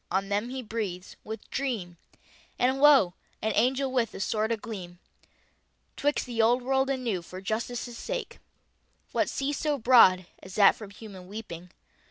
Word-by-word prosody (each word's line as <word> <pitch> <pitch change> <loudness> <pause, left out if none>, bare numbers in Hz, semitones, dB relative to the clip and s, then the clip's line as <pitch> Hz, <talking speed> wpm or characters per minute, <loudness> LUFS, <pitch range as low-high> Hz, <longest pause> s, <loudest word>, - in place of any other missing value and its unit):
On 195 +1 -1
them 205 +4 -1
He 260 0 -5
breathes 210 -5 -5
with 220 +1 -7
dream 225 -11 -3 0.6
And, 260 +2 +2
Lo! 275 -12 +6 0.3
an 220 - -1
Angel 260 +4 +2
with 240 -4 0
a - - -6
sword 215 +3 0
agleam 205 -6 -5 1.0
'Twix 290 +1 0
the 235 -3 -1
Old 240 +3 +3
World 265 +1 +1
and 260 -2 -1
New 205 -7 -1
for 185 +2 -9
Justice's 230 +4 -4
sake. - - -5 0.7
What - - +1
sea 275 +1 -2
so 295 0 0
broad, 225 -7 +6 0.2
as 190 -1 -11
that 200 -2 +6
from 215 -3 -10
Human 200 -3 -11
weeping? 180 -4 -8
225 Hz, 160 wpm, -28 LUFS, 195-260 Hz, 1.0 s, Lo